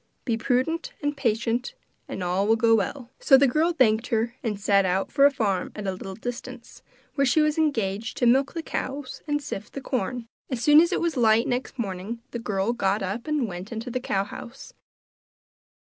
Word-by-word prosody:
Be 235 - +1
prudent 260 +8 -1
and 290 0 0
patient 240 - -1 0.3
and 185 - -5
all 185 +3 0
will 225 - +5
go 225 0 +3
well.' 235 +4 -1
So 270 - +6
the 280 - +5
girl 310 +6 +2
thanked 235 -7 +2
her, 230 +1 0
and 210 -4 -3
set 200 -1 +3
out 190 +1 0
for 280 0 +6
a - - +1
farm 200 -9 -1
at 210 - -6
a 190 - 0
little 190 +1 -7
distance, 245 +1 -8 0.3
where 280 - +1
she 275 +3 +3
was 305 0 +2
engaged 225 -8 -1
to 245 - +1
milk 265 +4 +3
the 330 - -3
cows 275 -2 -5
and 295 -1 -1
sift 210 -5 -6
the - - -4
corn. 245 -1 -3 0.2
As 255 - -2
soon 300 +1 +8
as 345 +2 +2
it - - 0
was 335 -4 -1
light 225 -1 +4
next 250 +2 -3
morning 205 +1 -4
the 235 - -4
girl 205 0 -1
got 200 -3 0
up 200 +8 -4
and 300 -6 0
went 185 +2 -7
into 230 +2 -5
the 255 - -1
cow 195 -6 -1
house. 245 - -10
235 Hz, 205 wpm, -25 LUFS, 210-275 Hz, 0.3 s, soon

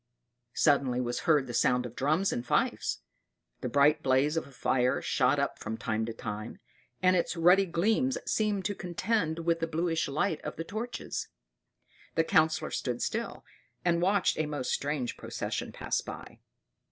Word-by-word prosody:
Suddenly 140 -4 +3
was 120 -1 -1
heard 150 -4 +5
the 120 - -7
sound 125 +1 +2
of 120 0 -8
drums 155 +8 +1
and 120 - -2
fifes; 120 - 0 0.6
the 125 - -3
bright 140 +4 +4
blaze 135 +4 +2
of 165 - -2
a - - -15
fire 125 -1 +1
shot - - +2
up - - -1
from 110 +1 -4
time 110 0 -2
to - - -3
time, 110 0 -6 0.5
and 185 0 +5
its 175 0 0
ruddy 180 +4 +5
gleams 220 +10 +1
seemed 210 -3 0
to 205 - 0
contend 180 -2 -1
with 165 -1 +2
the 165 - -1
bluish 165 0 0
light 155 +3 -1
of 150 - -5
the 165 - -4
torches. 220 +7 -4 0.9
The 165 - +4
Councillor 160 0 +2
stood 120 -2 -2
still, - - -3 0.4
and 170 -1 +2
watched 195 -1 +2
a 155 - +1
most 145 -4 -3
strange 140 -4 -2
procession - - -4
pass - - -2
by. - - -9
155 Hz, 165 wpm, -30 LUFS, 130-180 Hz, 0.9 s, heard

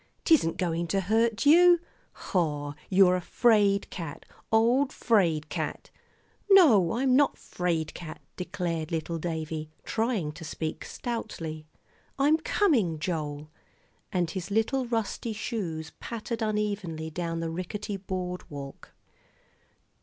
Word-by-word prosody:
"'Tisn't 290 - +4
going 170 -2 -1
to 195 +4 +1
hurt 225 +5 +1
you. 345 +3 +7 0.3
Hoh! 150 -5 -1 0.2
you're 185 -1 +5
a 180 - -1
'fraid 205 -2 +3
cat 165 -5 -7 0.3
old 240 +5 +3
'fraid 170 -9 +2
cat!" - - -4 0.6
"No, 265 - +6
I'm 255 +2 +2
not 285 +1 +3
'fraid 170 -3 -2
cat," 160 -3 -8 0.2
declared 175 -4 -3
little 165 0 -2
Davie, 160 -2 -4
trying 220 -9 -1
to 165 - -11
speak 155 +1 -4
stoutly; 165 -10 -5 0.5
"I'm 290 +3 +4
coming, 255 - +2
Joel," 150 -2 -4 0.6
and 175 -3 0
his 185 -1 -5
little 230 +5 +1
rusty 225 0 -2
shoes 175 -8 -4
pattered 230 0 -5
unevenly 205 -7 -2
down 165 0 -3
the 165 -1 -3
rickety 200 +4 -4
board 185 -1 -5
walk. 140 -2 -9
185 Hz, 120 wpm, -28 LUFS, 160-225 Hz, 0.6 s, you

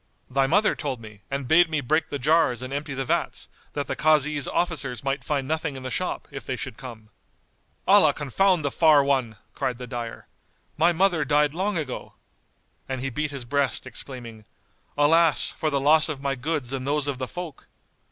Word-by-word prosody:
"Thy 135 +1 +2
mother 205 +8 +3
told 135 -4 -4
me, 105 -2 -13
and 140 -1 -3
bade 170 +3 +5
me 155 -2 0
break 155 +4 0
the 145 - -3
jars 140 -3 +2
and 130 +1 -6
empty 145 0 -4
the 135 0 -2
vats, - - -2 0.2
that 145 -1 -2
the - - -3
Kazi's 150 -2 +2
officers 135 -9 -2
might 135 +1 -2
find 140 -3 -2
nothing 155 -2 -2
in 130 - -8
the 130 - -5
shop, - - -3
if - - -7
they - - -3
should - - -6
come." 110 -4 -10 0.8
"Allah - - +6
confound 170 +4 +1
the 140 - 0
far 155 -3 +5
One!"[FN#197] 130 -6 0 0.2
cried 125 -2 -2
the 125 - -7
dyer; 120 -2 -6 0.5
"My 170 +3 +4
mother 175 -2 +2
died 145 0 +2
long 190 +3 -1
ago." 145 -5 -5 0.8
And 130 -1 -2
he 135 0 -3
beat 150 +5 -2
his 140 -4 -6
breast, 140 +1 0
exclaiming, 120 -3 -9 0.5
"Alas, 160 +1 +4
for 155 - -1
the 140 -2 0
loss 155 +3 +5
of 150 -3 -4
my 140 0 -1
goods 135 -1 -3
and 130 0 -3
those 145 0 0
of 140 -3 -3
the 130 - -3
folk!" 175 -3 -8
140 Hz, 195 wpm, -25 LUFS, 130-155 Hz, 0.8 s, Allah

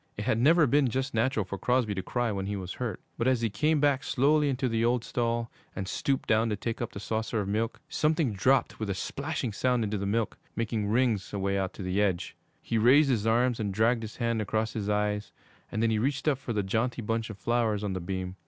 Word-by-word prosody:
It 105 - -4
had 110 - +1
never 155 +5 +5
been 140 +1 +3
just 130 +3 -2
natural 115 -2 +1
for 100 +1 -6
Crosby 125 -1 +1
to 95 - -2
cry 120 +4 -1
when 95 -1 -3
he 100 - -2
was 95 -2 -5
hurt; 115 -7 -3 0.2
but 115 - +1
as 130 -3 +2
he 115 -2 0
came 150 +7 +1 0.2
slowly 145 +4 +2
back - - +2
into 130 0 0
the 115 -1 0
old 120 0 +2
stall 115 -1 -1 0.2
and 95 -2 -4
stooped 135 +6 -1
down 110 +1 +3
to 105 - 0
take 115 +4 -4
up 120 - -3
the - - -6
saucer 110 +2 -2
of 100 - -4
milk, 110 +4 -1
something 155 -6 +1
dropped 130 +8 +2
with 110 -2 -3
a 100 - -1
splashing 140 +1 -3
sound 125 +2 +1
into 105 -1 -2
the 100 - -2
milk, 110 +2 -1 0.2
making 110 -2 -1
rings 110 -3 +1
away 100 0 0
out 95 0 -2
to 100 - -7
the 90 +2 0
edge. 95 -4 -1 0.3
He 115 - 0
raised 135 +5 +6
his 115 -3 0
arm 120 +3 +3
and 105 -2 -1
dragged 115 +4 +2
his 110 -1 -7
hand 115 -2 0
across 110 +1 -1
his 105 -2 -3
eyes, 105 0 0 0.4
and 110 - -1
then 115 - +3
he 110 - +1
reached 135 +6 -1
up 140 -4 +2
for 130 - -5
the 105 -3 0
jaunty 115 +5 -1
bunch 115 +1 -1
of 110 - -7
flowers 115 -2 0
on 100 -2 -1
the 95 - -2
beam. 95 +1 -4
115 Hz, 245 wpm, -28 LUFS, 105-125 Hz, 0.4 s, raised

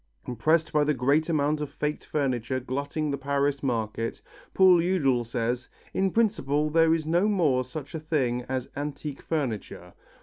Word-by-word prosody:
Impressed 155 +7 +1
by 150 -1 +4
the 150 0 +1
great 140 +6 +2
amount 150 -1 +1
of 150 - -3
faked 150 +1 -3
furniture 130 -3 -1
glutting 140 +4 -3
the 140 - -3
Paris 140 0 0
market, 115 -3 -2 0.4
Paul 185 -2 +6
Eudel 145 -9 +2
says, 120 +1 -2 0.2
"in 190 0 +2
principle 155 -9 +1
there 165 0 +4
is 160 -2 -3
no 175 +6 +2
more 155 -11 +2
such 130 +3 -8
a 160 - -3
thing 135 -6 0
as 130 -1 -2
antique 145 0 -5
furniture. 115 - -4
145 Hz, 160 wpm, -27 LUFS, 130-160 Hz, 0.4 s, Paul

